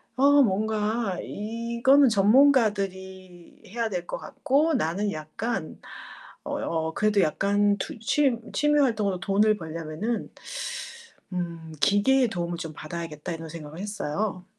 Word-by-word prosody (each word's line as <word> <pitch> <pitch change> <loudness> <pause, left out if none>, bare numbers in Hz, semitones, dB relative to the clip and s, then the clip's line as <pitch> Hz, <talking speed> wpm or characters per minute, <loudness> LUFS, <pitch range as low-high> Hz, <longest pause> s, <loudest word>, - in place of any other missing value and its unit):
아, 260 - -3 0.2
뭔가 215 0 -1
이거는 235 +6 +2
전문가들이 195 -6 +1
해야 230 +3 -2
될 180 -3 -4
것 - - -4
같고 300 +5 +1
나는 200 - 0
약간 155 +4 -4 0.6
어 - - -3
어 160 -1 -2
그래도 210 +1 +2
약간 200 +5 +2
투 210 - -6
취 260 +2 +2 0.2
'취미 295 0 +3
활동으로 210 -8 +1
돈을 210 +3 +2
벌려면은 165 +7 -4 1.0
음 170 -3 -5
기계의 245 - +4
도움을 175 -4 -3
좀 160 -3 -6
받아야겠다.' 160 +1 -6
이런 165 -1 -7
생각을 155 -1 -9
했어요. 200 -1 -3
200 Hz, 260 characters per minute, -26 LUFS, 170-230 Hz, 1.0 s, 기계의